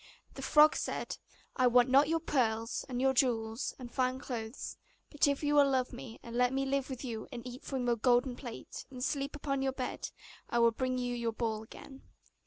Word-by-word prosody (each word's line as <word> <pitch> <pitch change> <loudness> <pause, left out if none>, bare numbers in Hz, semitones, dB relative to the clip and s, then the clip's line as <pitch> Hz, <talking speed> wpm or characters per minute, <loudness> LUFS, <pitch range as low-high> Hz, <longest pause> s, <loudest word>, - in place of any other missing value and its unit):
The - - -8
frog 300 0 +6
said, - - -3 0.4
'I 255 -1 +5
want 245 0 +5
not 275 +3 +5
your 330 0 +2
pearls, 230 -6 0
and 245 -1 -2 0.2
jewels, 230 -2 0
and 245 -2 -9
fine 255 -1 +1
clothes; 240 -3 -5 0.4
but 295 -1 +3
if 280 +1 0
you 295 0 +2
will 285 -1 +6
love 260 -2 0
me, 230 -3 -9
and 235 0 -8
let 250 0 +3
me 270 0 0
live 275 0 0
with 260 0 -5
you 225 -3 -5
and 240 -2 -7
eat 250 +1 -8
from 265 -2 -3
off - - -2
your 240 -1 +2
golden 245 +2 +3
plate, 240 -3 -8
and 255 -2 -6
sleep 285 -1 -1
upon 275 -2 -2
your 265 -1 0
bed, 255 -1 -4 0.4
I - - 0
will 235 0 +5
bring 255 +2 -1
you 245 -1 -1
your 235 -1 -1
ball 220 -2 -2
again. 265 +4 -12
255 Hz, 210 wpm, -32 LUFS, 235-275 Hz, 0.4 s, frog